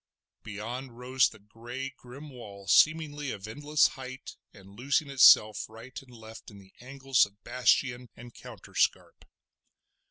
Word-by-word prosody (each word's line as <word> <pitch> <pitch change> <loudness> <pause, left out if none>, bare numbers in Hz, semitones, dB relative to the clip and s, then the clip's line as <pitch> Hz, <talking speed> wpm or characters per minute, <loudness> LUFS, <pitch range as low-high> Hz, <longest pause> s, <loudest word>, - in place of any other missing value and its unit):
Beyond 115 +4 -8
rose 130 +1 +1
the 110 - -15
grey, 120 +6 -8
grim 135 +4 -12
wall 100 -6 -12
seemingly 150 -3 +2
of 100 -2 -7
endless 145 +6 +1
height, 130 0 -10 0.2
and 100 -1 -17
losing 140 +5 -1
itself 110 -6 +5
right 115 +4 -11
and 135 - -20
left 110 -1 -13
in 105 - -14
the 95 -1 -18
angles 135 -1 +1
of 100 +2 -26
bastion 125 0 0
and 120 0 -13
counterscarp. - - -3
125 Hz, 135 wpm, -28 LUFS, 110-135 Hz, 0.2 s, itself